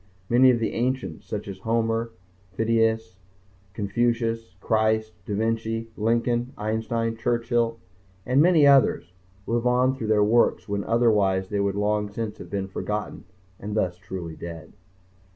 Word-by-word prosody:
Many 125 +2 +6
of 125 - +4
the 115 -1 -2
ancients 120 -8 -2
such 105 -1 -5
as 95 -2 -7
Homer, 115 +2 0 0.4
Phidias, 110 -2 0 0.5
Confucius, 115 0 -1
Christ, 110 -1 +1
da 105 - -2
Vinci, 115 +1 -2
Lincoln, 120 +3 0
Einstein, 110 +1 -1
Churchill 115 0 0 0.5
and 130 +3 +3
many 165 -3 +5
others 135 -9 +4 0.3
live 120 +1 0
on 125 +1 +3
through 120 -5 -5
their 105 -1 +4
works 115 +3 +2
when 100 -1 -2
otherwise 105 -5 +2
they 105 - -1
would 100 -1 0
long 105 0 0
since 110 0 -5
have - - -9
been 100 -1 -3
forgotten 105 +2 -4 0.3
and 105 +1 -5
thus 90 -3 -1
be 100 - -27
truly 85 -4 -6
dead. 85 -2 -9
110 Hz, 145 wpm, -25 LUFS, 100-115 Hz, 0.5 s, Many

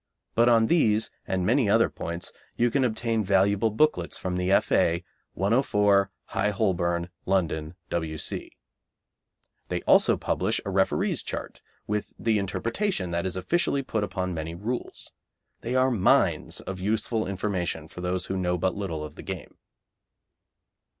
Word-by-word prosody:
But 120 +1 +4
on 115 -1 +5
these 110 -7 +3 0.2
and 95 -1 0
many 120 +1 +3
other 115 +3 +5
points 85 +1 -5 0.3
you 120 0 +3
can 135 +1 +2
obtain 115 -1 0
valuable 100 +3 +3
booklets 110 - +1
from 90 -1 -3
the 90 +1 0
F.A., 85 -2 +3 0.3
104, 100 -2 +3 0.2
High 105 - 0
Holborn, 85 -3 0 0.2
London, 85 -4 0 0.2
W.C. 80 -2 -3 1.2
They - - -2
publish - - +3
also - - -10
a - - -2
referees' - - +1
chart, - - -6 0.2
with 105 0 -3
the 110 -2 +1
interpretation 115 - -1
that 85 +2 -1
is 95 - -3
officially 140 - 0
put 110 -5 -1
upon 95 -3 -2
many 80 0 -4
rules. 115 +8 -4 0.5
They 120 +2 -3
are 130 0 +4
mines 105 -7 +2
of 95 -1 -6
useful 110 +3 -1
information 95 -5 -2
for 90 - -9
those 90 0 -1
who 95 - -3
know 90 -1 0
but 95 +2 0
little 90 -7 -4
of 75 - -7
the - - -10
game. - - -7
100 Hz, 145 wpm, -26 LUFS, 90-115 Hz, 1.2 s, on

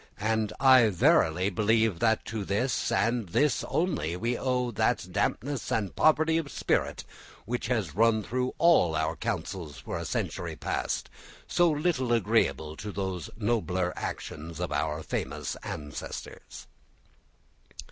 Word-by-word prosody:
And 110 0 0
I 130 -4 +7
verily 90 0 +3
believe 110 -1 +2
that 110 +1 +2
to 110 -2 -4
this, 105 +7 0
and 115 -5 +1
this 145 - +2
only, 150 - -1
we 115 +5 -1
owe 125 -1 0
that 105 - 0
dampness 135 +4 -1
and 105 -4 -1
poverty 160 +1 +4
of 145 -4 -5
spirit - - 0 0.4
which 120 +2 -3
has 110 - -1
run 110 +2 +3
through 125 +4 -2
all 160 - +4
our 80 0 0
councils 80 -6 -4
for - - -5
a - - -5
century - - -3
past, - - -2 0.4
so 175 -1 +3
little 150 -5 0
agreeable 80 -7 +1
to 105 - -6
those 95 -3 -4
nobler 100 -5 0
actions 80 +1 -6
of 90 - -3
our 75 +1 -1
famous - - -3
ancestors." 75 -2 -7
110 Hz, 135 wpm, -28 LUFS, 90-125 Hz, 0.4 s, I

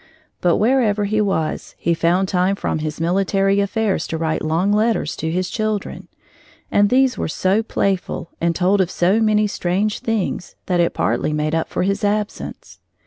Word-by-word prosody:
But 175 -1 +3
wherever 220 -3 +2
he 215 +1 +1
was, 190 -6 -2
he 170 - 0
found 175 +3 +1
time 185 +1 +1
from 160 - -2
his 155 0 -4
military 195 +3 +1
affairs 200 -3 0
to 165 - -3
write 160 -1 -1
long 165 +6 +1
letters 215 -7 +1
to 160 - -2
his 180 +2 -1
children, 215 0 -3 0.6
and 205 0 +4
these 260 0 +3
were - - -1
so 190 +6 +1
playful 195 -5 -2
and 170 0 +1
told 190 +2 +2
of 180 - 0
so 185 +4 +2
many 215 -1 +3
strange 200 +1 -1
things 220 -5 -2
that 180 -2 0
it 170 - +1
partly 155 - 0
made 150 +1 -1
up 165 0 -1
for - - -1
his 200 +2 -1
absence. 210 +1 -3
195 Hz, 175 wpm, -20 LUFS, 170-210 Hz, 0.6 s, and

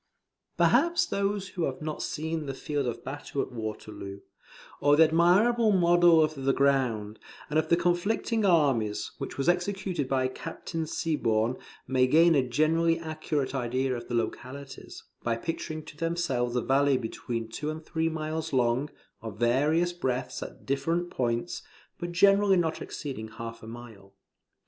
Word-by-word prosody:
Perhaps 345 0 +4
those 200 -1 -1
who 175 -3 -2
have 130 - -4
not 155 0 -4
seen 160 0 -3
the 135 - -4
field 145 -1 -2
of 120 - -4
battle 140 0 -6
at - - -1
Waterloo, 105 -3 -6 0.6
or 145 +1 +5
the 160 - +7
admirable 195 +8 +4
model 175 -3 +5
of 155 0 0
the 135 -2 0
ground, 125 -7 +1 0.3
and 155 - +3
of 155 0 -2
the 170 - +5
conflicting 190 +6 0
armies, 135 - +2
which - - -6
was 135 - -1
executed 180 -4 0
by 130 -1 +2
Captain 165 +3 -5
Siborne, 120 -8 0 0.3
may 130 0 +2
gain 165 +5 +5
a 140 - +4
generally 160 +6 +2
accurate 155 -4 -3
idea 130 0 -1
of 120 - -7
the 120 - -3
localities, 130 +4 -5 0.2
by 115 -1 0
picturing 155 +3 -5
to - - -11
themselves 150 -7 -1
a 125 - +2
valley 135 +2 +3
between 115 -1 -4
two 150 +7 -4
and 155 +1 -6
three 165 -1 0
miles 160 0 -3
long, 125 +2 +1 0.3
of 110 -3 -7
various 150 +9 +2
breadths 125 -6 -3
at - - -9
different 165 +6 -1
points, 120 -2 -2 0.4
but 175 0 -4
generally 195 +2 +5
not 165 -2 0
exceeding 130 -7 -6
half 115 +1 -8
a 110 - -10
mile. 110 -4 -11
145 Hz, 155 wpm, -28 LUFS, 125-165 Hz, 0.6 s, the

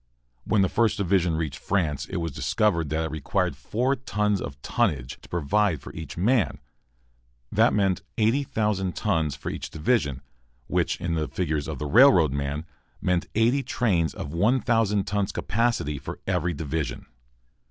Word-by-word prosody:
When 105 -3 +3
the - - +3
First 110 +2 +1
Division 90 -4 +2
reached 75 -4 -3
France 75 -8 -1
it - - -7
was 85 -2 -2
discovered 85 - +1
that 80 +2 0
it 80 - -4
required 80 -2 -1
four 125 +5 0
tons 105 -5 0
of 70 -1 -6
tonnage 65 -3 -1
to - - -16
provide 90 +1 +1
for - - -11
each 80 +1 -8
man. 105 - +2 0.9
That - - +4
meant 95 -3 +1 0.2
80,000 105 -5 +1
tons 80 -9 0
for - - -5
each - - -5
division, 75 - 0 0.4
which, - - 0
in 85 -1 -2
the 80 -2 -1
figures 75 -5 -2
of 80 -3 -4
the 75 - -4
railroad 90 - +6
man, 70 +2 -3 0.3
meant 90 -1 0
eighty 120 +5 +3
trains 95 -12 0
of 70 - -6
1,000 110 0 +2
tons 100 -1 -1
capacity 105 - 0
for 65 - -7
every 85 -3 0
division. 75 0 -3
90 Hz, 155 wpm, -26 LUFS, 75-105 Hz, 0.9 s, railroad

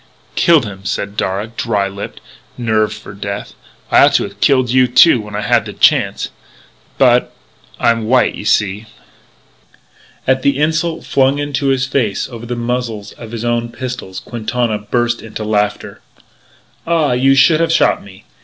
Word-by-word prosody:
"Killed 165 -7 +4
him," 95 -2 -9
said 100 +1 -3
Darragh, 105 +4 -3
dry 105 -4 0
lipped, 100 +1 -8 0.4
nerved 110 -3 0
for 105 -1 -11
death. 100 0 -6 0.4
"I - - +6
ought - - +2
to - - +3
have - - -9
killed 130 -3 +3
you, 130 0 +4
too, 125 +1 +5
when 105 -1 -9
I 105 - -2
had 105 - +2
the - - -7
chance. - - +2 0.7
But - - +3 0.5
I'm 115 -2 +1
white, 125 +1 +3
you - - -8
see." 105 +1 0 1.4
At 130 0 +2
the 140 0 +1
insult 160 +2 -1
flung 135 +1 +2
into 145 -1 -2
his 135 -1 +1
face 125 -6 -1
over 120 -2 -9
the 120 - -3
muzzles 120 -3 -3
of 115 -2 -11
his 115 0 -5
own 120 0 -1
pistols, 125 -7 -6
Quintana 120 -1 -2
burst 120 +2 -1
into 110 -1 -7
laughter. 105 -1 -2 0.9
"Ah! 165 -4 +2
You 135 +2 +3
should 155 +4 +5
have 165 -1 +1
shot 165 - +2
me! 100 0 -15
120 Hz, 165 wpm, -16 LUFS, 105-130 Hz, 1.4 s, I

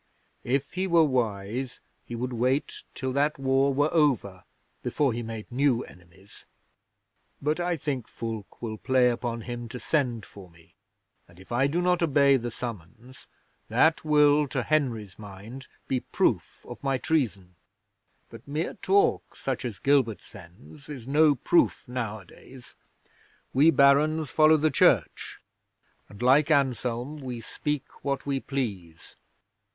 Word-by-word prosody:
If 135 +3 -1
he 190 +1 -1
were 170 -2 +5
wise 120 -1 -2 0.3
he 120 - -5
would 125 +2 -3
wait 130 +4 -1
till 130 -2 -3
that 145 +2 +1
war 135 +1 +2
were 145 +3 +1
over 125 - +1 0.4
before 140 -5 0
he 120 - -3
made 110 -2 -6
new 130 -1 +2
enemies. 90 +3 -17 0.9
But 150 +4 -1
I 175 -1 -1
think 135 -5 -3
Fulke 115 -1 -7
will 110 -2 -4
play 130 -1 +3
upon 120 -1 -4
him 120 0 -6
to 125 - -7
send 125 -9 -1
for 95 -3 -14
me, 85 -1 -22 0.5
and 90 0 -19
if 95 - -16
I 130 +3 +2
do 170 +5 -1
not 180 -1 +2
obey 140 -3 +4
the 120 -2 -2
summons, 115 +2 -9 0.4
that 145 +8 +3
will, 150 -1 +4
to 130 -2 -2
Henry's 115 - -1
mind, 110 +6 -10 0.2
be 130 - 0
proof - - -1
of - - -9
my 135 -1 +1
treason. 110 - -1 0.8
But - - -13
mere 150 +4 -2
talk, 195 +1 +1
such 130 -2 -3
as 115 -5 -5
Gilbert 130 -1 +1
sends, 115 - -15
is 130 -5 -8
no 150 +1 +4
proof 170 +5 +1
nowadays. 120 +1 -7 0.8
We 145 +5 +5
Barons 150 +1 +3
follow 155 0 +5
the 155 +1 +1
Church, - - +2 0.7
and, 100 +3 -9
like 140 +4 +4
Anselm, 130 -1 0
we 130 -4 -6
speak 150 +4 -5
what 140 -1 -2
we 140 -1 -1
please. 100 - -5
130 Hz, 145 wpm, -27 LUFS, 115-145 Hz, 0.9 s, were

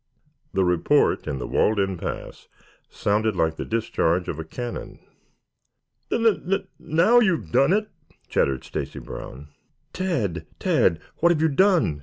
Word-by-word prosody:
The 95 - +3
report, 90 -2 +2
in 70 - -2
the 60 - -4
walled 110 -1 +1
in 95 -1 0
pass, 85 - -6 0.4
sounded 105 +1 0
like 80 -2 0
the - - -3
discharge 90 -6 0
of 80 - -4
a - - -3
cannon. 120 +9 -6 1.1
"N 230 - +1
n 220 -3 +3
n 195 - 0
now 170 +10 +4
you've 170 - +1
done 140 - +4
it," 210 +2 +1 0.4
chattered 65 -1 0
Stacy - - -5
Brown. 70 +3 -9 0.4
"Tad, 110 - -2
Tad! 80 - +2 0.2
What 170 - +4
have 165 - +1
you 160 0 +3
done?" 160 - +3
110 Hz, 150 wpm, -24 LUFS, -, 1.1 s, now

